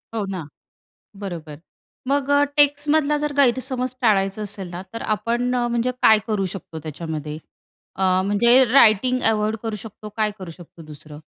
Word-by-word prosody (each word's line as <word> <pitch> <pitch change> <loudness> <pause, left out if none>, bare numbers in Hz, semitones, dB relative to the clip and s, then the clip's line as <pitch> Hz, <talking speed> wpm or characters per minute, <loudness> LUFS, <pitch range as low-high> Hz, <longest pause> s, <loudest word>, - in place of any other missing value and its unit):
हो 215 - -1
ना. 185 -6 -6 0.7
बरोबर. 165 -7 -7 0.5
मग 280 0 0
अ, 285 0 +4
टेक्स्टमधला 290 +1 +3
जर 295 0 -3
गैरसमज 255 -1 +1
टाळायचा 200 -3 +1
असेल 200 -2 -5
ना 175 +1 -7
तर 230 - -6
आपण 240 +3 -1
अ, 240 -1 0
म्हणजे 240 +1 0
काय 220 -1 +6
करू 205 -3 -1
शकतो 165 -3 -9
त्याच्यामध्ये? 155 -1 -6 0.6
अ, 185 -1 +2
म्हणजे 235 +6 +5
रायटिंग 250 0 +4
अव्हॉइड 215 0 -1
करू 225 -1 -3
शकतो? 215 0 -10
काय 215 -1 +1
करू 185 -3 -8
शकतो 170 0 -14
दुसरं? 150 0 -12
215 Hz, 155 wpm, -22 LUFS, 185-255 Hz, 0.7 s, काय